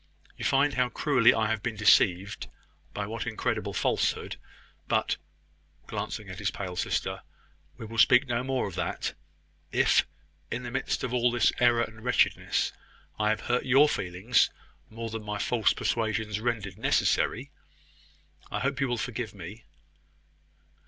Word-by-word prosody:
You -, -, -8 dB
find 140 Hz, +1 st, +3 dB
how 125 Hz, -1 st, +1 dB
cruelly 130 Hz, -4 st, +4 dB
I 110 Hz, -, +1 dB
have 110 Hz, -2 st, -1 dB
been 115 Hz, -1 st, -3 dB
deceived 100 Hz, -2 st, +3 dB, 0.4 s
by -, -, -3 dB
what -, -, -5 dB
incredible -, -, -2 dB
falsehood. -, -, 0 dB, 0.5 s
But," -, -, +1 dB, 0.7 s
glancing -, -, -5 dB
at -, -, -8 dB
his -, -, 0 dB
pale 90 Hz, -3 st, -5 dB
sister, 90 Hz, -, -2 dB, 0.6 s
"we 115 Hz, -, -7 dB
will 115 Hz, +1 st, -5 dB
speak 125 Hz, +4 st, +6 dB
no 120 Hz, 0 st, -1 dB
more 130 Hz, -3 st, -1 dB
of 95 Hz, -, -7 dB
that. 90 Hz, -, -3 dB, 0.6 s
If, -, -, +3 dB, 0.4 s
in 125 Hz, -, -4 dB
the 120 Hz, -, -5 dB
midst 135 Hz, +1 st, -2 dB
of 125 Hz, -, -2 dB
all 125 Hz, 0 st, +3 dB
this 120 Hz, 0 st, +3 dB
error 120 Hz, -1 st, +4 dB
and 110 Hz, -1 st, -8 dB
wretchedness, 125 Hz, 0 st, +1 dB, 0.5 s
I 105 Hz, 0 st, +2 dB
have 110 Hz, -, 0 dB
hurt 125 Hz, 0 st, 0 dB
your 135 Hz, +3 st, +6 dB
feelings 95 Hz, +2 st, +1 dB, 0.4 s
more 115 Hz, 0 st, -6 dB
than 115 Hz, 0 st, -4 dB
my 105 Hz, 0 st, -4 dB
false 110 Hz, +1 st, +2 dB
persuasions 110 Hz, -2 st, -1 dB
rendered 110 Hz, -4 st, -3 dB
necessary... -, -, +1 dB, 1.0 s
I -, -, -3 dB
hope 140 Hz, +1 st, -1 dB
you 135 Hz, -, +2 dB
will 120 Hz, -1 st, -1 dB
forgive 115 Hz, -3 st, -4 dB
me." 100 Hz, +4 st, -9 dB
115 Hz, 150 wpm, -28 LUFS, 105-125 Hz, 1.0 s, speak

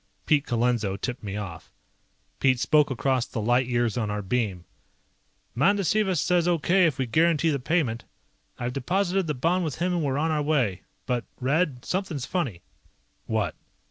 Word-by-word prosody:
Pete 145 Hz, -2 st, +2 dB
Colenso 115 Hz, -4 st, 0 dB
tipped 125 Hz, +5 st, -4 dB
me 100 Hz, -2 st, -5 dB
off. 95 Hz, -6 st, -7 dB, 0.7 s
Pete 130 Hz, -2 st, +3 dB
spoke 150 Hz, +3 st, +3 dB
across 130 Hz, -1 st, 0 dB
the 115 Hz, -, -5 dB
light 120 Hz, +3 st, +2 dB
years 120 Hz, -1 st, 0 dB
on 110 Hz, -3 st, -1 dB
our 105 Hz, 0 st, -3 dB
beam. 95 Hz, -4 st, -1 dB, 0.9 s
"Mandasiva 195 Hz, -, +2 dB
says 175 Hz, +2 st, +2 dB
okay 175 Hz, +2 st, +3 dB
if 150 Hz, -4 st, -2 dB
we 130 Hz, -, 0 dB
guarantee 160 Hz, +5 st, +2 dB
the 140 Hz, -, -1 dB
payment. 130 Hz, -5 st, 0 dB, 0.5 s
I've 120 Hz, +1 st, -3 dB
deposited 185 Hz, +6 st, 0 dB
the 150 Hz, -, -1 dB
bond 170 Hz, +8 st, +1 dB
with 155 Hz, -5 st, -2 dB
him 180 Hz, +2 st, -1 dB
and 175 Hz, -, 0 dB
we're 135 Hz, -1 st, 0 dB
on 160 Hz, +2 st, +1 dB
our 150 Hz, -1 st, +1 dB
way. 130 Hz, -11 st, +1 dB, 0.2 s
But, 125 Hz, -2 st, -1 dB
Red, 135 Hz, 0 st, 0 dB
something's 180 Hz, -8 st, -2 dB
funny." 135 Hz, -, -3 dB, 0.6 s
"What?" 110 Hz, -7 st, 0 dB
135 Hz, 165 wpm, -26 LUFS, 120-165 Hz, 0.9 s, Pete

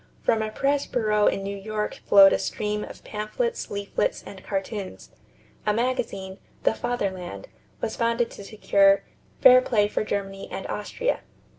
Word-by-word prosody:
From 225 Hz, -1 st, +2 dB
a 215 Hz, -, -2 dB
press 280 Hz, +5 st, 0 dB
bureau 210 Hz, -3 st, +2 dB
in 195 Hz, -, +1 dB
New 200 Hz, +1 st, -4 dB
York 210 Hz, +1 st, -3 dB
flowed 195 Hz, -1 st, +8 dB
a -, -, +1 dB
stream 210 Hz, 0 st, -2 dB
of -, -, -10 dB
pamphlets, 340 Hz, -, -3 dB
leaflets, 200 Hz, 0 st, -2 dB
and 195 Hz, -, -10 dB
cartoons. 195 Hz, 0 st, -5 dB, 0.5 s
A 210 Hz, -1 st, +1 dB
magazine, 230 Hz, -6 st, -2 dB, 0.2 s
"The -, -, +3 dB
Fatherland," 200 Hz, -, -3 dB, 0.3 s
was -, -, -3 dB
founded 235 Hz, 0 st, +1 dB
to -, -, -10 dB
secure 200 Hz, -1 st, +3 dB, 0.4 s
"fair 255 Hz, -1 st, +9 dB
play 210 Hz, -5 st, +2 dB
for 210 Hz, -, -1 dB
Germany 195 Hz, -2 st, -4 dB
and -, -, -6 dB
Austria." -, -, -2 dB
210 Hz, 150 wpm, -25 LUFS, 195-235 Hz, 0.5 s, fair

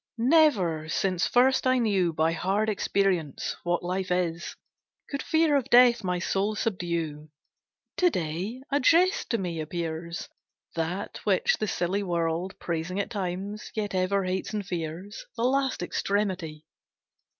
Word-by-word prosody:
Never, 225 Hz, -, +3 dB
since 185 Hz, 0 st, +1 dB
first 260 Hz, +1 st, +3 dB
I 255 Hz, 0 st, +4 dB
knew 200 Hz, -7 st, +2 dB
By 160 Hz, +1 st, +1 dB
hard 195 Hz, +6 st, 0 dB
experience 190 Hz, -7 st, 0 dB
what 175 Hz, 0 st, -1 dB
life 185 Hz, +1 st, -2 dB
is, 175 Hz, -2 st, -1 dB, 0.6 s
Could 280 Hz, 0 st, -2 dB
fear 320 Hz, -2 st, +2 dB
of 275 Hz, -4 st, 0 dB
death 240 Hz, -2 st, +6 dB
my 180 Hz, -1 st, 0 dB
soul 195 Hz, +4 st, 0 dB
subdue. 170 Hz, -7 st, -2 dB, 0.7 s
To 360 Hz, -, +5 dB
day, 185 Hz, -, -3 dB
a 285 Hz, -, +3 dB
jest 350 Hz, +8 st, +3 dB
to 230 Hz, -, +1 dB
me 175 Hz, -5 st, -3 dB
appears, 165 Hz, +1 st, -4 dB, 0.5 s
That 170 Hz, +4 st, -3 dB
which -, -, +2 dB
the 215 Hz, -, -1 dB
silly 185 Hz, +2 st, -1 dB
world, 170 Hz, 0 st, -1 dB
Praising 170 Hz, +3 st, -3 dB
at 200 Hz, -, -2 dB
times, 200 Hz, +1 st, -4 dB
yet 210 Hz, -2 st, -2 dB
ever 190 Hz, +1 st, +1 dB
hates 185 Hz, +3 st, -2 dB
and 205 Hz, -2 st, -2 dB
fears, 175 Hz, +3 st, -5 dB
The 230 Hz, -, -1 dB
last 265 Hz, -4 st, +1 dB
extremity! 185 Hz, -6 st, -2 dB
190 Hz, 140 wpm, -27 LUFS, 170-220 Hz, 0.7 s, death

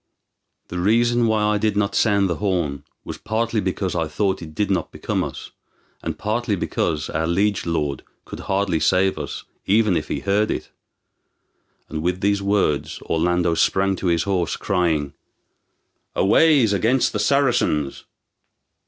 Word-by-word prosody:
The 90 Hz, -, -4 dB
reason 120 Hz, +4 st, +3 dB
why 110 Hz, -1 st, +1 dB
I 105 Hz, 0 st, +2 dB
did 105 Hz, -1 st, 0 dB
not 100 Hz, -1 st, +1 dB
sound 100 Hz, -3 st, +3 dB
the 85 Hz, -3 st, -2 dB
horn 90 Hz, -8 st, -1 dB, 0.2 s
was -, -, -7 dB
partly 110 Hz, 0 st, -1 dB
because 95 Hz, -1 st, -2 dB
I 85 Hz, -2 st, -1 dB
thought 95 Hz, +5 st, -1 dB
it 80 Hz, -2 st, -9 dB
did 105 Hz, -1 st, 0 dB
not 90 Hz, -4 st, -1 dB
become -, -, -2 dB
us, -, -, -7 dB, 0.5 s
and -, -, -4 dB
partly 110 Hz, +1 st, -1 dB
because 80 Hz, -4 st, -2 dB
our 80 Hz, +1 st, -1 dB
liege 95 Hz, +2 st, 0 dB
lord 75 Hz, -5 st, -1 dB, 0.2 s
could -, -, -8 dB
hardly 95 Hz, -4 st, 0 dB
save 95 Hz, +3 st, +2 dB
us, -, -, -6 dB, 0.2 s
even 105 Hz, -1 st, +3 dB
if -, -, -2 dB
he -, -, -3 dB
heard 100 Hz, +2 st, +1 dB
it." -, -, -4 dB, 1.2 s
And 80 Hz, +1 st, -4 dB
with 90 Hz, +2 st, -1 dB
these 100 Hz, 0 st, +1 dB
words 100 Hz, -7 st, 0 dB
Orlando 85 Hz, +1 st, +1 dB
sprang 95 Hz, +3 st, +2 dB
to 95 Hz, -, -3 dB
his 85 Hz, -2 st, +2 dB
horse, 95 Hz, -4 st, -1 dB
crying, 80 Hz, -6 st, 0 dB, 1.0 s
"Aways 130 Hz, +1 st, +4 dB
against 115 Hz, +6 st, +2 dB
the 105 Hz, -, -1 dB
Saracens!" 120 Hz, -, +1 dB
95 Hz, 155 wpm, -22 LUFS, 85-105 Hz, 1.2 s, Aways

